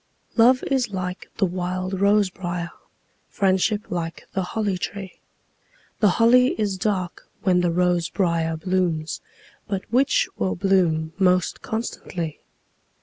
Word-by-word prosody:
Love 250 +2 +5
is 265 -4 0
like 185 -1 -5
the 200 - +3
wild 185 +1 -3
rose 200 -1 +4
briar; 175 -2 -4 0.6
Friendship 200 +2 +1
like 165 -2 -4
the 190 - 0
holly 205 +1 -1
tree. 190 +1 -6 0.8
The 210 - +5
holly 250 +1 +5
is 205 -3 0
dark 185 -2 -2 0.2
when 180 -2 +3
the 175 - +2
rose 175 0 +1
briar 165 -4 0
blooms, 175 -3 -1 0.5
But 195 -2 -2
which 280 - +3
will 185 - 0
bloom 175 -4 +1
most 180 -2 +2
constantly? 180 -7 -4
185 Hz, 125 wpm, -23 LUFS, 175-205 Hz, 0.8 s, Love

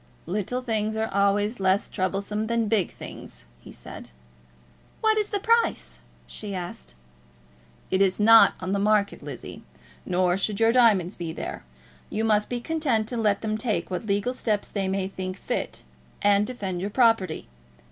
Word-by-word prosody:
"Little 210 +7 -2
things 220 -2 -1
are 220 0 -2
always 200 +3 +2
less 190 +1 +2
troublesome 200 +2 -2
than 230 -1 0
big 205 -5 +1
things," - - -10
he - - -13
said. - - -10 0.9
"What 440 0 +3
is 420 - -1
the 405 - -1
price?" 460 +3 +1 0.3
she 205 -2 -6
asked. 60 - -7 1.0
"It 190 - +2
is 190 0 +2
not 225 +2 +7
in 185 0 -4
the 200 - +1
market, 205 0 +2
Lizzie. - - -8 0.4
Nor 180 0 +1
should 200 +1 -1
your 225 0 +5
diamonds 215 -7 +4
be 170 -2 -5
there. - - -6 0.5
You 220 - -2
must 210 -1 +2
be 245 - -2
content 265 -6 0
to 245 - -3
let 210 -3 +1
them 215 -1 -2
take 220 -4 -2
what 180 +4 -3
legal 205 +5 0
steps 215 -5 -1
they 195 -2 -2
may 190 0 -1
think 185 -1 -5
fit, - - -4 0.4
and 205 0 +4
defend 195 -8 -4
your 200 - -2
property. 225 -4 +2
210 Hz, 165 wpm, -25 LUFS, 190-225 Hz, 1.0 s, not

